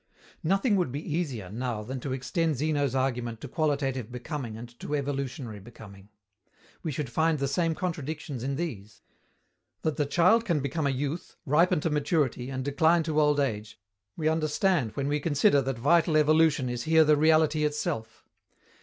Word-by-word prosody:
Nothing 195 Hz, +5 st, +2 dB
would 175 Hz, -9 st, 0 dB
be 150 Hz, +3 st, -4 dB
easier, 125 Hz, -, -3 dB
now, 115 Hz, -1 st, -3 dB
than 130 Hz, +4 st, -5 dB
to 130 Hz, -, -5 dB
extend 150 Hz, +5 st, -1 dB
Zeno's 145 Hz, -1 st, 0 dB
argument 125 Hz, -3 st, -1 dB
to -, -, -6 dB
qualitative 135 Hz, -, -1 dB
becoming 125 Hz, -2 st, -5 dB
and 120 Hz, +2 st, -8 dB
to 150 Hz, -, -3 dB
evolutionary 135 Hz, -5 st, -4 dB
becoming. 100 Hz, -2 st, -13 dB, 0.7 s
We 160 Hz, -, -3 dB
should 145 Hz, 0 st, -3 dB
find 160 Hz, +6 st, +1 dB
the 140 Hz, -1 st, -1 dB
same 165 Hz, +3 st, 0 dB
contradictions 150 Hz, -6 st, -4 dB
in 135 Hz, +1 st, -2 dB
these. 115 Hz, -, -6 dB, 0.8 s
That 155 Hz, -3 st, -1 dB
the 145 Hz, -, 0 dB
child 185 Hz, +10 st, +4 dB
can 170 Hz, -9 st, 0 dB
become 140 Hz, +2 st, -1 dB
a -, -, +2 dB
youth, 140 Hz, +5 st, -3 dB
ripen 150 Hz, +3 st, +3 dB
to 165 Hz, -, -1 dB
maturity 145 Hz, -4 st, 0 dB
and 130 Hz, -1 st, -4 dB
decline 160 Hz, +4 st, +3 dB
to 155 Hz, -1 st, +1 dB
old 150 Hz, -1 st, +3 dB
age, 110 Hz, -8 st, -2 dB, 0.4 s
we 155 Hz, -2 st, -1 dB
understand 155 Hz, -, +1 dB
when 140 Hz, -1 st, -2 dB
we 145 Hz, +1 st, 0 dB
consider 145 Hz, +1 st, +3 dB
that 135 Hz, -2 st, -3 dB
vital 160 Hz, +5 st, +3 dB
evolution 155 Hz, -3 st, +3 dB
is 120 Hz, -1 st, -3 dB
here 160 Hz, 0 st, +5 dB
the 150 Hz, 0 st, +5 dB
reality 155 Hz, 0 st, +3 dB
itself. 150 Hz, -7 st, -3 dB
145 Hz, 170 wpm, -28 LUFS, 130-160 Hz, 0.8 s, here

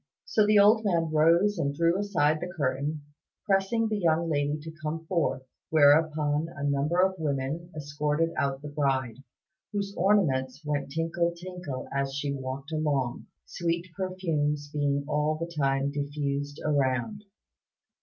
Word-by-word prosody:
So 215 Hz, -1 st, +2 dB
the 210 Hz, 0 st, +5 dB
old 215 Hz, +2 st, +6 dB
man 170 Hz, -5 st, +1 dB
rose 170 Hz, +6 st, +4 dB
and 140 Hz, -3 st, -1 dB
drew 170 Hz, +2 st, +2 dB
aside 155 Hz, -7 st, +1 dB
the 180 Hz, 0 st, -4 dB
curtain, 145 Hz, -1 st, -2 dB, 0.4 s
pressing 200 Hz, +4 st, +2 dB
the 215 Hz, -1 st, -1 dB
young 165 Hz, -2 st, +1 dB
lady 145 Hz, 0 st, 0 dB
to 160 Hz, 0 st, -8 dB
come 160 Hz, +1 st, -4 dB
forth; 160 Hz, -7 st, 0 dB, 0.3 s
whereupon 150 Hz, 0 st, +4 dB
a 140 Hz, -, -6 dB
number 145 Hz, +4 st, +1 dB
of 190 Hz, -1 st, 0 dB
women 150 Hz, +3 st, -2 dB
escorted 150 Hz, +2 st, -1 dB
out 135 Hz, 0 st, -1 dB
the -, -, -5 dB
bride, 135 Hz, -5 st, 0 dB, 0.5 s
whose 200 Hz, -1 st, -3 dB
ornaments 150 Hz, -8 st, +1 dB
went 145 Hz, -2 st, -2 dB
tinkle 170 Hz, +2 st, 0 dB
tinkle 175 Hz, -6 st, -6 dB
as 140 Hz, 0 st, -1 dB
she 145 Hz, 0 st, -2 dB
walked 135 Hz, +2 st, -6 dB
along, 145 Hz, -6 st, -1 dB, 0.2 s
sweet 170 Hz, +1 st, -2 dB
perfumes 155 Hz, -6 st, -2 dB
being 140 Hz, -1 st, 0 dB
all 150 Hz, +1 st, +1 dB
the 170 Hz, +2 st, -5 dB
time 135 Hz, -1 st, +1 dB
diffused 145 Hz, 0 st, -3 dB
around. 145 Hz, -, 0 dB
150 Hz, 145 wpm, -28 LUFS, 140-170 Hz, 0.5 s, old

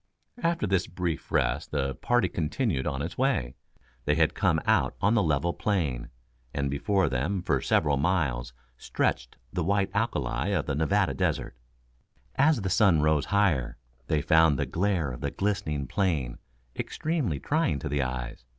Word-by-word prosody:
After 170 Hz, -8 st, +1 dB
this 95 Hz, -2 st, +1 dB
brief 90 Hz, -3 st, -4 dB
rest -, -, 0 dB
the 70 Hz, -2 st, -1 dB
party 120 Hz, -, +1 dB
continued 80 Hz, -, -1 dB
on 70 Hz, -1 st, -2 dB
its 85 Hz, +7 st, -6 dB
way. 130 Hz, -, +1 dB, 0.5 s
They 75 Hz, -, +2 dB
had 80 Hz, -1 st, +3 dB
come -, -, +2 dB
out -, -, +2 dB
on 100 Hz, +3 st, +3 dB
the 115 Hz, -, +4 dB
level 85 Hz, 0 st, +1 dB
plain, 80 Hz, -, -1 dB, 0.5 s
and 70 Hz, -1 st, -1 dB
before 95 Hz, +7 st, +1 dB
them 85 Hz, +9 st, -1 dB
for -, -, +1 dB
several 75 Hz, -2 st, +2 dB
miles 70 Hz, -7 st, 0 dB, 0.3 s
stretched -, -, -2 dB, 0.2 s
the 90 Hz, -, -1 dB
white 100 Hz, +2 st, +1 dB
alkali -, -, -1 dB
of 85 Hz, -7 st, 0 dB
the 70 Hz, -, -2 dB
Nevada 85 Hz, +3 st, +1 dB
Desert. 65 Hz, -, -1 dB, 0.8 s
As 150 Hz, -4 st, +3 dB
the 95 Hz, -, -1 dB
sun 95 Hz, -6 st, +4 dB
rose 75 Hz, -1 st, +2 dB
higher, 100 Hz, -11 st, +1 dB, 0.3 s
they 75 Hz, -3 st, +1 dB
found 80 Hz, -3 st, +4 dB
the -, -, 0 dB
glare 90 Hz, -6 st, 0 dB
of 60 Hz, -, -8 dB
the -, -, -1 dB
glistening 75 Hz, -8 st, -2 dB
plain 75 Hz, -6 st, -1 dB, 0.4 s
extremely 150 Hz, -, -2 dB
trying 145 Hz, -, 0 dB
to -, -, -5 dB
the 70 Hz, 0 st, 0 dB
eyes. 60 Hz, -2 st, -4 dB
80 Hz, 160 wpm, -27 LUFS, 70-100 Hz, 0.8 s, the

